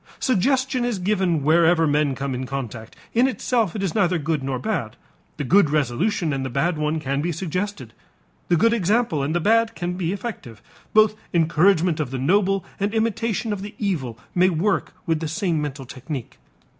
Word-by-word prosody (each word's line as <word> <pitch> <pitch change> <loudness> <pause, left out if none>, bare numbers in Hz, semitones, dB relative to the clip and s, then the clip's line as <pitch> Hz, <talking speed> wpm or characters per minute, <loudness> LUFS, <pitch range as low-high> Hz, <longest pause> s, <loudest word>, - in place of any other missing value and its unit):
Suggestion 260 +2 +1
is 240 -4 -1
given 185 -5 0
wherever 165 +2 +4
men 145 -2 +1
come 135 0 -3
in 130 +1 -4
contact; 120 -5 -6 0.2
in 245 +3 +4
itself 230 -4 0
it 200 - -2
is 190 - -1
neither 185 -4 +2
good 155 -1 -1
nor 135 -1 -2
bad. 165 - -3 0.4
The - - -2
good 175 +4 +4
resolution 155 - 0
and 135 -1 -2
the 130 - -3
bad 165 +8 0
one 150 +1 -1
can 140 -1 -1
be 175 +3 -1
suggested, 180 - -4 0.5
the 175 - +3
good 230 +7 +4
example 210 - +1
and 145 +4 -1
the - - +3
bad 225 +5 +2
can 175 +2 -3
be 180 -2 -2
effective; 195 - -6 0.3
both 215 0 +5 0.2
encouragement 170 +1 +3
of 150 - -1
the 130 - -4
noble 195 +7 +2
and 205 +2 -1
imitation 225 0 0
of 200 - -5
the 205 +2 -8
evil 150 - -2 0.2
may 185 +1 +4
work 190 +4 0
with 165 -3 0
the 160 - -3
same 170 -1 -1
mental 140 -2 -5
technique. 130 0 -7
170 Hz, 185 wpm, -23 LUFS, 145-205 Hz, 0.5 s, both